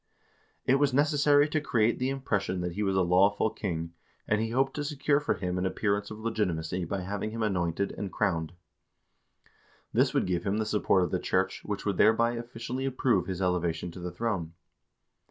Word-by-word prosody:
It 135 Hz, +1 st, +4 dB
was 140 Hz, -3 st, +2 dB
necessary 145 Hz, 0 st, +4 dB
to 155 Hz, 0 st, 0 dB
create 115 Hz, -5 st, +1 dB
the 130 Hz, +1 st, 0 dB
impression 100 Hz, -9 st, -1 dB
that 90 Hz, 0 st, -2 dB
he 100 Hz, +5 st, -4 dB
was 95 Hz, -2 st, +1 dB
a 95 Hz, -, +3 dB
lawful 100 Hz, +5 st, +3 dB
king, 85 Hz, -4 st, -4 dB, 0.3 s
and 105 Hz, 0 st, +2 dB
he 110 Hz, -, -1 dB
hoped 135 Hz, +3 st, +1 dB
to 145 Hz, -, -1 dB
secure 145 Hz, -1 st, +1 dB
for 150 Hz, -, 0 dB
him 90 Hz, -1 st, -2 dB
an 90 Hz, -, -1 dB
appearance 100 Hz, +1 st, -1 dB
of 110 Hz, -, -7 dB
legitimacy 90 Hz, -6 st, -2 dB
by 95 Hz, +3 st, -3 dB
having 100 Hz, +3 st, -3 dB
him 115 Hz, +1 st, -3 dB
anointed 95 Hz, -2 st, 0 dB
and 100 Hz, -2 st, -5 dB
crowned. 80 Hz, -4 st, -1 dB, 1.4 s
This -, -, +3 dB
would -, -, +2 dB
give 90 Hz, -2 st, -1 dB
him 100 Hz, +1 st, 0 dB
the 110 Hz, -, 0 dB
support 105 Hz, -3 st, +2 dB
of 90 Hz, -, -2 dB
the -, -, 0 dB
church, 95 Hz, +1 st, 0 dB
which 105 Hz, -1 st, -4 dB
would 100 Hz, -3 st, 0 dB
thereby 115 Hz, +2 st, +4 dB
officially 120 Hz, +2 st, -5 dB
approve 120 Hz, -8 st, +1 dB
his 95 Hz, 0 st, -3 dB
elevation 90 Hz, -2 st, -1 dB
to 90 Hz, -, -10 dB
the 90 Hz, 0 st, -4 dB
throne. 90 Hz, -4 st, -3 dB
100 Hz, 190 wpm, -29 LUFS, 90-120 Hz, 1.4 s, It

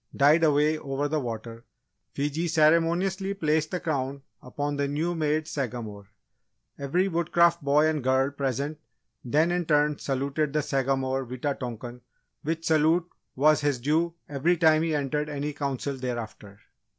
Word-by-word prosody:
died 150 Hz, +4 st, +5 dB
away 150 Hz, 0 st, +3 dB
over 140 Hz, 0 st, -2 dB
the 155 Hz, +1 st, -1 dB
water, 115 Hz, -2 st, -6 dB, 0.5 s
Fiji 150 Hz, +4 st, -2 dB
ceremoniously 170 Hz, +5 st, +2 dB
placed 155 Hz, -3 st, 0 dB
the 180 Hz, -, -2 dB
Crown 140 Hz, -4 st, -3 dB, 0.2 s
upon 145 Hz, +3 st, -3 dB
the 140 Hz, 0 st, 0 dB
new 155 Hz, +5 st, -1 dB
made 155 Hz, -1 st, 0 dB
Sagamore. 115 Hz, -8 st, -5 dB, 0.7 s
Every 170 Hz, +8 st, +1 dB
Woodcraft 170 Hz, -1 st, +2 dB
boy 145 Hz, +2 st, +4 dB
and 155 Hz, -4 st, -1 dB
girl 130 Hz, +2 st, +2 dB
present 140 Hz, +2 st, -3 dB, 0.4 s
then 155 Hz, +7 st, +2 dB
in 175 Hz, -2 st, -1 dB
turn 150 Hz, -1 st, +2 dB
saluted 140 Hz, +2 st, -1 dB
the 150 Hz, -1 st, +1 dB
Sagamore 135 Hz, -1 st, 0 dB
Wita 130 Hz, +4 st, -2 dB
tonkan, 120 Hz, -1 st, -7 dB, 0.4 s
which 165 Hz, +2 st, -3 dB
salute 160 Hz, +2 st, +3 dB, 0.3 s
was 150 Hz, +3 st, +4 dB
his 145 Hz, -4 st, 0 dB
due 160 Hz, +6 st, 0 dB
every 150 Hz, +5 st, +1 dB
time 155 Hz, -1 st, +4 dB
he 160 Hz, -1 st, 0 dB
entered 150 Hz, +1 st, -1 dB
any 145 Hz, 0 st, -3 dB
Council 140 Hz, -1 st, -3 dB
thereafter. 120 Hz, -5 st, -6 dB
145 Hz, 145 wpm, -26 LUFS, 135-160 Hz, 0.7 s, died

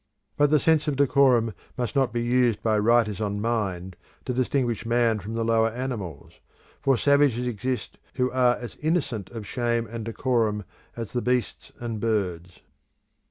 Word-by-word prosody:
But 145 Hz, 0 st, +3 dB
the 150 Hz, -, +5 dB
sense 155 Hz, +1 st, +2 dB
of 145 Hz, -, 0 dB
decorum 130 Hz, -5 st, +3 dB, 0.2 s
must 125 Hz, +2 st, -3 dB
not 135 Hz, -2 st, +2 dB
be 120 Hz, -1 st, -1 dB
used 120 Hz, -2 st, +2 dB
by 110 Hz, -2 st, +2 dB
writers 110 Hz, -2 st, +2 dB
on 105 Hz, -1 st, -2 dB
Mind 95 Hz, -5 st, -2 dB, 0.3 s
to 125 Hz, -, -2 dB
distinguish 125 Hz, -2 st, 0 dB
man 115 Hz, -1 st, +2 dB
from 105 Hz, +3 st, -6 dB
the 115 Hz, 0 st, -1 dB
lower 115 Hz, 0 st, +3 dB
animals, 115 Hz, -, -6 dB, 0.4 s
for 135 Hz, -2 st, +3 dB
savages 140 Hz, -3 st, +3 dB
exist 125 Hz, +2 st, -3 dB, 0.2 s
who 125 Hz, -1 st, +1 dB
are 125 Hz, -1 st, +3 dB
as 120 Hz, -1 st, -9 dB
innocent 150 Hz, -, -1 dB
of 115 Hz, -3 st, -7 dB
shame 120 Hz, 0 st, -1 dB
and 115 Hz, +1 st, -6 dB
decorum 115 Hz, -2 st, 0 dB, 0.3 s
as 115 Hz, -3 st, -6 dB
the 120 Hz, -, 0 dB
beasts 125 Hz, -2 st, -1 dB
and 115 Hz, -2 st, -4 dB
birds. 90 Hz, -6 st, -2 dB
120 Hz, 160 wpm, -25 LUFS, 110-125 Hz, 0.4 s, the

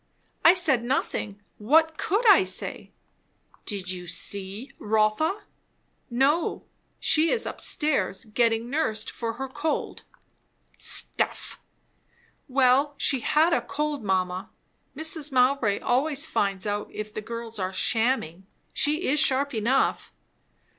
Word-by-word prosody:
"I 340 Hz, -, +8 dB
said 305 Hz, -10 st, +3 dB
nothing. 230 Hz, -5 st, -2 dB, 0.2 s
What 315 Hz, +9 st, +3 dB
could 430 Hz, +6 st, +1 dB
I 390 Hz, -2 st, +7 dB
say?" -, -, -4 dB, 0.8 s
"Did 190 Hz, -4 st, -3 dB
you 180 Hz, -1 st, -6 dB
see 200 Hz, +8 st, -3 dB
Rotha?" 220 Hz, -, +1 dB, 0.7 s
"No; 275 Hz, +7 st, +1 dB, 0.4 s
she 320 Hz, +1 st, +3 dB
is 465 Hz, -, +1 dB
up -, -, -6 dB
stairs, 230 Hz, -11 st, -1 dB
getting 225 Hz, +1 st, +1 dB
nursed 240 Hz, -6 st, -2 dB
for 230 Hz, -1 st, -4 dB
her 265 Hz, +3 st, -5 dB
cold." 295 Hz, +4 st, -3 dB, 0.7 s
"Stuff!" -, -, -1 dB, 0.9 s
"Well, 270 Hz, +2 st, +3 dB
she 270 Hz, -, +4 dB
had 315 Hz, +7 st, +2 dB
a -, -, +2 dB
cold, 295 Hz, -3 st, -3 dB
mamma. 185 Hz, -1 st, -1 dB, 0.5 s
Mrs. 315 Hz, -1 st, 0 dB
Mowbray 250 Hz, -5 st, +2 dB
always 285 Hz, +4 st, +1 dB
finds 200 Hz, -10 st, -1 dB
out 205 Hz, 0 st, -3 dB
if 215 Hz, 0 st, -7 dB
the 215 Hz, -, -4 dB
girls 230 Hz, 0 st, -6 dB
are 185 Hz, 0 st, -2 dB
shamming. 220 Hz, -4 st, 0 dB, 0.3 s
She 305 Hz, +4 st, +1 dB
is 295 Hz, +3 st, +2 dB
sharp 275 Hz, +2 st, +1 dB
enough." 235 Hz, +4 st, 0 dB
250 Hz, 120 wpm, -26 LUFS, 210-300 Hz, 0.9 s, I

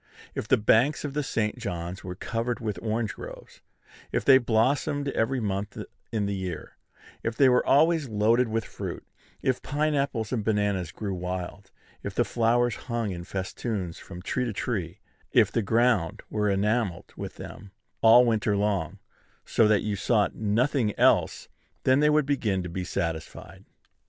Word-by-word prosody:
If -, -, -4 dB
the 130 Hz, -, +4 dB
banks 115 Hz, +8 st, +3 dB
of 140 Hz, -, -4 dB
the 150 Hz, -, 0 dB
St. 115 Hz, -3 st, -2 dB
John's 90 Hz, -5 st, -5 dB
were 90 Hz, 0 st, -6 dB
covered 115 Hz, +5 st, -3 dB
with 105 Hz, -6 st, -3 dB
orange 110 Hz, 0 st, -1 dB
groves, -, -, -11 dB, 0.5 s
if -, -, -1 dB
they 135 Hz, -1 st, +8 dB
blossomed 135 Hz, +5 st, +1 dB
every 130 Hz, +1 st, 0 dB
month 100 Hz, -1 st, -3 dB, 0.3 s
in 110 Hz, -3 st, 0 dB
the 100 Hz, -, -1 dB
year, 95 Hz, -3 st, -5 dB, 0.5 s
if 115 Hz, -, -2 dB
they 135 Hz, -, +6 dB
were 125 Hz, -1 st, +4 dB
always 155 Hz, -1 st, +3 dB
loaded 115 Hz, +4 st, +3 dB
with 110 Hz, 0 st, -2 dB
fruit, -, -, -6 dB, 0.4 s
if 130 Hz, -1 st, +1 dB
pine 150 Hz, +2 st, 0 dB
apples 135 Hz, -7 st, -1 dB
and 115 Hz, -4 st, -1 dB
bananas 100 Hz, -5 st, 0 dB
grew 100 Hz, -3 st, -4 dB
wild, 90 Hz, +2 st, -5 dB, 0.3 s
if -, -, -6 dB
the -, -, +2 dB
flowers 120 Hz, 0 st, +2 dB
hung 115 Hz, -4 st, -1 dB
in 85 Hz, -1 st, -6 dB
festoons 95 Hz, -1 st, -4 dB
from 90 Hz, -1 st, -10 dB
tree 125 Hz, +5 st, -1 dB
to 115 Hz, -, -3 dB
tree, 95 Hz, -6 st, -3 dB, 0.3 s
if -, -, +5 dB
the 115 Hz, -, +1 dB
ground 110 Hz, -5 st, +1 dB
were 105 Hz, -1 st, +1 dB
enamelled 100 Hz, -2 st, 0 dB
with -, -, -7 dB
them 100 Hz, -, -10 dB, 0.3 s
all 115 Hz, +2 st, +8 dB
winter 110 Hz, -3 st, +1 dB
long, 100 Hz, -1 st, -1 dB, 0.5 s
so 110 Hz, -, +3 dB
that 105 Hz, -1 st, +3 dB
you 105 Hz, -1 st, -1 dB
saw 105 Hz, +1 st, +2 dB
nothing 115 Hz, +2 st, 0 dB
else, -, -, +3 dB, 0.4 s
then 130 Hz, +1 st, +4 dB
they 150 Hz, 0 st, +4 dB
would 150 Hz, -1 st, +3 dB
begin 110 Hz, -10 st, 0 dB
to 90 Hz, -, -5 dB
be 90 Hz, +2 st, -4 dB
satisfied. 80 Hz, -3 st, -5 dB
110 Hz, 165 wpm, -27 LUFS, 100-125 Hz, 0.5 s, they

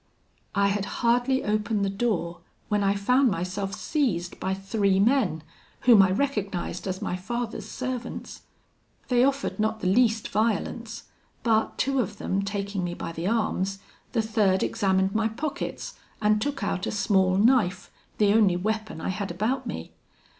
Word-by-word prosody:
"I 200 Hz, 0 st, +3 dB
had 200 Hz, 0 st, -1 dB, 0.2 s
hardly 245 Hz, +3 st, +3 dB
opened 210 Hz, -1 st, 0 dB
the -, -, 0 dB
door, 195 Hz, -5 st, -1 dB, 0.3 s
when 210 Hz, -1 st, +1 dB
I 200 Hz, 0 st, +2 dB
found 250 Hz, +6 st, +3 dB
myself 190 Hz, +1 st, -3 dB
seized 195 Hz, -, -1 dB
by 190 Hz, +1 st, -1 dB
three 195 Hz, 0 st, +1 dB
men, 205 Hz, -, +2 dB, 0.4 s
whom 235 Hz, -5 st, +7 dB
I 190 Hz, -, +4 dB
recognised 200 Hz, -6 st, -2 dB
as 190 Hz, +2 st, -3 dB
my 180 Hz, -, -2 dB
father's 235 Hz, +5 st, -4 dB
servants. 255 Hz, -1 st, -5 dB, 0.7 s
They 245 Hz, -1 st, +4 dB
offered 275 Hz, -3 st, 0 dB
not 220 Hz, +1 st, 0 dB
the -, -, -6 dB
least 220 Hz, +2 st, +3 dB
violence, 225 Hz, +1 st, -1 dB, 0.4 s
but 220 Hz, -2 st, +1 dB
two 275 Hz, 0 st, +1 dB
of 210 Hz, -4 st, -2 dB
them 195 Hz, 0 st, -1 dB
taking 200 Hz, -1 st, -3 dB
me 175 Hz, 0 st, -3 dB
by -, -, -5 dB
the 165 Hz, +2 st, -4 dB
arms, 195 Hz, -3 st, 0 dB, 0.4 s
the 225 Hz, -3 st, +2 dB
third 210 Hz, -4 st, +2 dB
examined 190 Hz, -1 st, +1 dB
my 220 Hz, 0 st, +2 dB
pockets, 275 Hz, +7 st, -4 dB, 0.3 s
and 215 Hz, 0 st, +2 dB
took 280 Hz, +2 st, -2 dB
out 185 Hz, -, -1 dB
a -, -, -1 dB
small 190 Hz, -3 st, +2 dB
knife, 200 Hz, -5 st, +2 dB, 0.3 s
the 205 Hz, -1 st, +4 dB
only 210 Hz, -5 st, +4 dB
weapon 215 Hz, -2 st, -2 dB
I -, -, -2 dB
had 195 Hz, +1 st, -3 dB
about 215 Hz, +10 st, -1 dB
me. -, -, -6 dB
210 Hz, 160 wpm, -26 LUFS, 190-235 Hz, 0.7 s, whom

